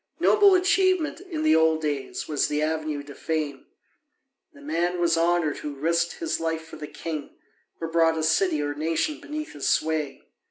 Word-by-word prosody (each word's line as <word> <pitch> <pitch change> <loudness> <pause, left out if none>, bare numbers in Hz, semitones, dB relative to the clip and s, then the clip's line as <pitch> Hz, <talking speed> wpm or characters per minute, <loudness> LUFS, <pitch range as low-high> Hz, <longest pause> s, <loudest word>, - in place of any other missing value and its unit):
Noble 405 -2 +6
achievement 370 -3 +2
in 345 -5 -5
the 310 - +5
old 160 0 +4
days 145 -3 -3
was 150 -2 +1
the 150 - -1
avenue 155 -2 -2
to 145 0 -11
fame: 150 -4 -3 0.8
the 285 - -17
man 175 - -1
was 170 -1 +3
honoured 165 -2 +1
who 150 -1 -6
risked 170 +4 0
his 330 -1 -3
life 160 0 -2
for 160 - -11
the 150 - -7
king, 155 -2 -6 0.4
or 165 - -3
brought 165 0 +2
a 160 - -1
city 160 -1 +2
or 145 0 -2
nation 165 - -1
beneath 305 0 -6
his 145 - -2
sway. 155 -3 0
160 Hz, 175 wpm, -25 LUFS, 155-195 Hz, 0.8 s, Noble